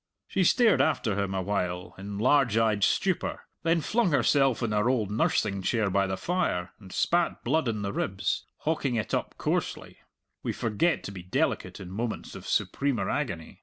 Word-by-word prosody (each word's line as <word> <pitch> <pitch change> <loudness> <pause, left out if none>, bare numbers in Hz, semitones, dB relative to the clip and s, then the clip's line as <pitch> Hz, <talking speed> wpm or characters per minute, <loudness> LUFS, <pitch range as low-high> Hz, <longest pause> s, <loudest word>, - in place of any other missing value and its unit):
She 195 - +1
stared 230 +5 +5
after 115 -9 +1
him 100 -1 -1
a 95 - -1
while 90 -2 -2
in 100 +1 -7
large 125 0 +3
eyed 110 -3 +2
stupor, 190 - +1 0.2
then 165 0 +2
flung 220 +5 +1
herself 135 -4 +3
in 115 - 0
her 105 +3 +2
old 110 -6 0
nursing 105 -2 +1
chair 105 0 +1
by 100 0 +2
the 95 0 -2
fire, 95 - -1
and 95 -3 -13
spat 175 - +1
blood 155 +3 +1
in 110 -3 -1
the 100 0 -2
ribs, 95 0 -1
hawking 150 -5 0
it 110 -5 -2
up - - -1
coarsely - - -2 0.4
we - - -2
forget 115 +10 0
to - - -6
be 95 -2 -8
delicate 90 - -1
in 90 -2 -8
moments 115 +3 -4
of - - -9
supremer 140 -4 0
agony. 95 - -3
110 Hz, 180 wpm, -28 LUFS, 95-145 Hz, 0.4 s, stared